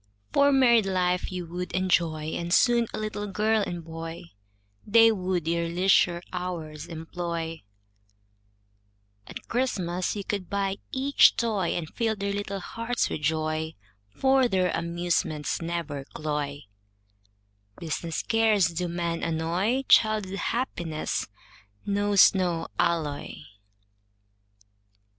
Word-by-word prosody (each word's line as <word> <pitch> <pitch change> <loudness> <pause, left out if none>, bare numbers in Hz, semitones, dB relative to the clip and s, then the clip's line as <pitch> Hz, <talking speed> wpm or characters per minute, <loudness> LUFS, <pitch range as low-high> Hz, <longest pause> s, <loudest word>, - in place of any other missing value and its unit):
For 280 0 +5
married 240 -6 +5
life 180 -1 0
you 180 -1 -4
would 180 +2 -6
enjoy, 170 -4 +1
And 170 +1 -4
soon 235 +4 +4
a - - -5
little 210 -1 -4
girl 215 +3 +1
and 175 -4 -4
boy, 165 - -8 0.5
They 225 +1 +6
would 185 -5 -2
your 170 0 0
leisure 175 0 +3
hours 165 -4 -5
employ, 165 0 -5 1.7
At - - -9
Christmas 185 -9 -1
you 205 - -4
could 200 -4 -4
buy 195 -1 -1
each 275 +2 +5
toy, 210 -7 0
And 165 -3 -4
fill 225 +5 -1
their 200 0 -2
little 200 -1 -3
hearts 230 +5 -2
with - - -3
joy, 155 +1 -1 0.3
For 265 - +3
their 185 -5 +1
amusements 170 -3 -1
never 165 -4 -3
cloy, 150 -1 -4 1.1
Business 165 0 -3
cares 220 -5 +3
do 175 +1 -3
men 170 -1 -2
annoy, 170 +10 0
Child's 215 -3 +4
happiness 190 -7 -2 0.6
knows 205 -1 +5
no 180 -4 -1
alloy. 155 -4 0
180 Hz, 115 wpm, -27 LUFS, 165-205 Hz, 1.7 s, They